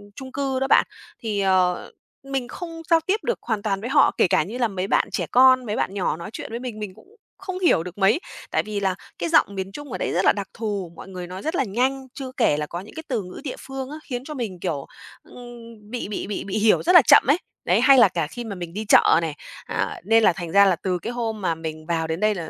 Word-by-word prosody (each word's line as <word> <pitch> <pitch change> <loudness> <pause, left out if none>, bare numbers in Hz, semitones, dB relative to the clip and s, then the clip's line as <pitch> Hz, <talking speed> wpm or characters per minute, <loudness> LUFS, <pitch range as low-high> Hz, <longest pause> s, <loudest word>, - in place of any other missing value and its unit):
chung 260 -1 -9
cư 270 -1 -1
đó 270 - 0
bạn, - - +5 0.3
thì, 215 -3 -2
ờ, 185 -2 +1 0.3
mình 270 -2 -3
không 330 +2 -7
giao 330 -1 +6
tiếp 410 +4 0
được 485 - -1
hoàn 220 -3 -2
toàn 195 -2 -1
với 240 - -4
họ. - - +5
Kể - - +4
cả 155 - +3
như 225 +8 -7
là 240 -2 +2
mấy 190 -1 -3
bạn - - +2
trẻ - - -1
con, 255 0 +6
mấy 210 - -2
bạn 195 - -1
nhỏ 180 -6 -1
nói 170 - -7
chuyện - - -6
với 235 - -4
mình, 240 -4 -6
mình 205 -3 -5
cũng 440 - -20 0.2
không 375 -1 -6
hiểu 335 - +3
được 180 +2 -9
mấy, 205 - +3 0.3
tại - - +1
vì 210 -2 -4
là 190 -2 0 0.2
cái 170 -1 -2
giọng 200 - +3
miền 190 0 -4
Trung 290 +1 -9
ở - - -3
đây - - -2
rất 180 +3 +1
là - - +7
đặc 200 -1 -4
thù, 205 -6 -4
mọi - - -11
người 180 -2 -7
nói 185 +2 -7
rất 320 +3 -2
là 270 - +2
nhanh, 260 +5 -1
chưa 260 -2 -7
kể 225 - +3
là 150 - -2
có 175 - -5
những 205 +9 -12
cái 320 - -6
từ 235 -8 -1
ngữ 180 - -10
địa 270 - -4
phương 270 0 -6
á, 300 - -7
khiến 250 -2 -5
cho 305 - -6
mình, 215 -10 -5
kiểu, 155 -7 -3 0.4
ưm, 235 -3 -13
bị 245 -4 -4
bị 205 - -4
bị 210 - -4
bị 200 +2 -3
hiểu 215 0 +4
rất 360 +2 +3
là 340 - +11
chậm - - +8
ấy. 290 +5 +5 0.3
Đấy, - - +3
hay 275 -1 +7
là 235 - +8
cả 165 -4 -2
khi 240 +8 -7
mà 210 -4 -6
mình 175 -1 -7
đi 215 +2 -4
chợ 200 - +6
này, 160 -3 -3 0.3
à, - - -3
nên 225 +3 +4
là 180 - +5
thành 170 -1 -6
ra 200 +1 +6
là 190 - +3
từ 180 +1 -2
cái 235 - -5
hôm 225 -3 -3
mà 170 -3 0
mình 155 -1 -7
vào 165 -1 -1
đến 160 +1 -3
đây 215 +1 +2
là 165 -4 -5
215 Hz, 280 wpm, -23 LUFS, 185-255 Hz, 0.4 s, là